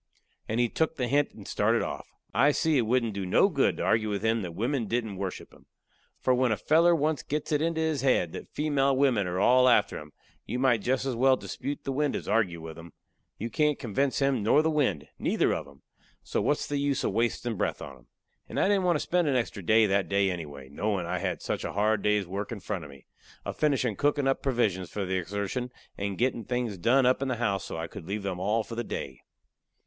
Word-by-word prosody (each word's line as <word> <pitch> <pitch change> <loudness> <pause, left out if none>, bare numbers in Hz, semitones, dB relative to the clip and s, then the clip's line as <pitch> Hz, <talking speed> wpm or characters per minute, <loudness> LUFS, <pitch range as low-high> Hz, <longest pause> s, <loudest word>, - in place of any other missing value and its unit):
And 110 +2 -1
he 120 - +3
took 160 +7 -1
the 125 -4 -1
hint 145 +3 +1
and - - -11
started - - +1
off. - - -5 0.3
I 140 +5 +4
see 160 0 +1
it 120 -5 +2
wouldn't 120 -2 +1
do 100 0 -3
no 90 - +4
good - - +1
to - - -2
argue 110 -1 +2
with 100 0 -2
him 110 0 +2
that 85 -3 -6
wimmen 120 +3 -1
didn't 110 -3 -2
worship 95 -1 -5
him. - - -20 0.5
For 130 - +1
when 125 -1 +2
a 110 - +1
feller 170 +3 +4
once 155 -3 0
gets 150 +1 -4
it 150 -1 +2
into 165 0 0
his 160 -3 0
head 125 -11 +2
that - - -8
female 140 -3 +1
wimmen 125 -9 +2
are 90 +1 -2
all 125 +4 +5
after 105 -4 +3
him, 75 -1 -12 0.4
you 125 - -2
might 125 -4 +3
jest 130 +4 0
as 130 -3 -1
well 130 +2 +4
dispute 145 +1 -5
the 135 - -3
wind 145 +1 0
as - - -5
argue 100 -7 +1
with 80 0 -8
him. 85 -1 -12 0.4
You 115 +2 -5
can't 150 -1 +2
convince 135 +3 -1
him 135 -4 +1
nor 130 +9 +4
the 160 - +2
wind 130 - 0
neither - - +1
of - - -4
'em - - -18 0.4
so - - -1
what's 145 - 0
the 145 -1 -2
use 140 -1 0
of - - 0
wastin' 115 +2 -1
breath - - -1
on 70 - -8
'em. - - -22 0.4
And - - -3
I - - +3
didn't 195 -2 +2
want 175 -1 +3
to - - +1
spend 175 -2 +1
a 140 - +2
extra 115 -4 -2
breath 110 +5 +4
that 100 0 +1
day 100 -1 +2
anyway, 75 -6 -7
knowin' 95 +6 -2
I 85 - -2
had - - -3
such - - -2
a - - -4
hard 105 +1 +1
day's 105 -1 +2
work 100 +5 -5
in 115 - -5
front 95 -2 -4
of 75 - -10
me, 70 -2 -15 0.4
a - - -3
finishin' 130 -7 0
cookin' 145 -1 +1
up 135 - +1
provisions 105 -9 0
for 100 -2 -3
the 95 0 -1
exertion, 100 +7 -3 0.2
and 100 -1 -3
gettin' 120 -1 0
things 120 -5 -2
done 125 +7 +4
up 130 +1 +3
in 135 - -1
the 130 - -1
house 100 -5 -1
so 90 - -6
I 80 - -3
could 80 0 -10
leave 100 0 -3
'em 95 -2 -2
for - - -7
all 105 +4 +1
day. 115 - -5
115 Hz, 240 wpm, -28 LUFS, 100-135 Hz, 0.5 s, all